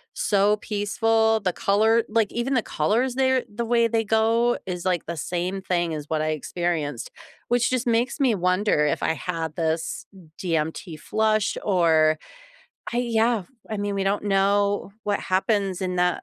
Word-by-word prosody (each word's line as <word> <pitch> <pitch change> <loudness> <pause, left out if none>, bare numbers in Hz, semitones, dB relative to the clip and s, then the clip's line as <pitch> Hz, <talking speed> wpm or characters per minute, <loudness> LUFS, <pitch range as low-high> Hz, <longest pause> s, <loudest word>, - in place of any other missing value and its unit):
so 205 +1 +2
peaceful, 220 +2 +1
the 185 -3 -1
color 220 +3 +2
like, 220 -2 +1
even 240 +3 -2
the 240 - +3
colors 245 +4 0
there 260 -1 +2
the 235 - -2
way 235 0 +3
they 225 0 0
go 225 +2 +2
is, 180 -1 -4
like, 180 -3 0
the 170 -1 -4
same 180 +4 -3
thing 175 -3 -1
as 150 - -6
what 155 -1 0
I 155 - 0
experienced, 170 - -3 0.4
which 245 0 +2
just 255 -1 -1
makes 235 +5 +1
me 260 -5 +3
wonder 180 -3 +2
if 145 - 0
I - - +2
had 160 0 -4
this 160 -1 -2
m 180 -5 -16
DMT 160 0 -2
flush 215 +2 0
or 160 -5 +3 0.8
I - - 0
yeah, 230 -3 +1 0.3
I 215 - -3
mean, 205 0 -2
we 195 - 0
don't 200 +2 0
know 200 0 +1
what 205 -1 0
happens 195 0 0
in 180 -1 -2
that 180 0 +1
200 Hz, 170 wpm, -24 LUFS, 175-225 Hz, 0.8 s, the